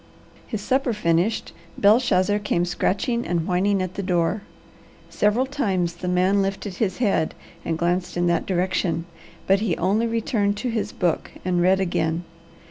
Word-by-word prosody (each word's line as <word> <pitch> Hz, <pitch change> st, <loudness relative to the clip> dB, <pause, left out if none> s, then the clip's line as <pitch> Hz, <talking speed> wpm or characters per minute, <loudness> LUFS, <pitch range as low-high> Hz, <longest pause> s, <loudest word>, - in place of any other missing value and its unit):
His 220 Hz, -4 st, -4 dB
supper 260 Hz, +2 st, +1 dB
finished, 180 Hz, +1 st, 0 dB, 0.2 s
Belshazzar 205 Hz, -2 st, +3 dB
came 175 Hz, -4 st, 0 dB
scratching 205 Hz, +7 st, 0 dB
and 170 Hz, -2 st, 0 dB
whining 190 Hz, +2 st, +1 dB
at 185 Hz, -1 st, -5 dB
the 200 Hz, -, -4 dB
door. 180 Hz, +1 st, 0 dB, 0.7 s
Several 210 Hz, +5 st, +2 dB
times 195 Hz, -, -1 dB
the 180 Hz, -, -5 dB
man 185 Hz, +3 st, +3 dB
lifted 195 Hz, -1 st, -3 dB
his 190 Hz, -5 st, 0 dB
head 195 Hz, -9 st, +1 dB, 0.3 s
and 165 Hz, -, -2 dB
glanced 175 Hz, +1 st, -1 dB
in 175 Hz, -, +1 dB
that 170 Hz, -1 st, +1 dB
direction, 180 Hz, -2 st, 0 dB, 0.4 s
but 195 Hz, +1 st, +4 dB
he 205 Hz, -6 st, 0 dB
only 205 Hz, +6 st, +1 dB
returned 215 Hz, -3 st, 0 dB
to 245 Hz, +4 st, -2 dB
his 210 Hz, -2 st, -2 dB
book 175 Hz, -4 st, -1 dB, 0.2 s
and 180 Hz, -1 st, +1 dB
read 190 Hz, +2 st, +4 dB
again. 170 Hz, -2 st, 0 dB
190 Hz, 155 wpm, -23 LUFS, 175-210 Hz, 0.7 s, but